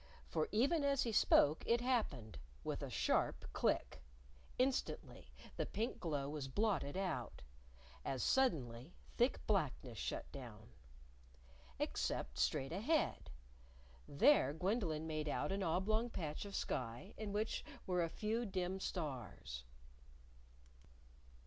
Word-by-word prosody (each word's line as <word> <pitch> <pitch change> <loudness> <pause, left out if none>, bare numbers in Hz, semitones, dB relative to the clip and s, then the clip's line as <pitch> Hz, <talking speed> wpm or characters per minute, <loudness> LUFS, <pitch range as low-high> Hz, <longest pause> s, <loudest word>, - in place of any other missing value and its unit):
For 155 - -1
even 280 +9 +3
as 280 -1 +3
he 235 - -1
spoke 155 -6 +5
it 235 +1 +4
happened 215 - -1 0.2
with - - -2
a - - -4
sharp - - +1
click. - - +1 0.6
Instantly 260 +1 -1 0.3
the - - 0
pink 225 +3 -2
glow 145 -5 -1
was 145 -2 -3
blotted 180 -2 0
out. 190 -3 -2 0.6
As 130 -3 -1
suddenly 145 - +1 0.2
thick 245 +3 +2
blackness 140 - 0
shut - - -3
down. 115 -5 -9 1.1
Except 65 -2 -1
straight 130 - +1
ahead! 265 - +1 0.8
There 145 - +5
Gwendolyn 175 -3 0
made 155 -1 -2
out 145 +4 0
an 195 +1 0
oblong 210 +7 +1
patch 160 -5 -4
of 200 - -6
sky 125 - -3
in 215 -2 -4
which 210 +2 -1 0.2
were 180 -1 +1
a 165 - -1
few 220 +6 -1
dim 190 -3 -2
stars. 130 - -4
180 Hz, 120 wpm, -39 LUFS, 140-220 Hz, 1.1 s, spoke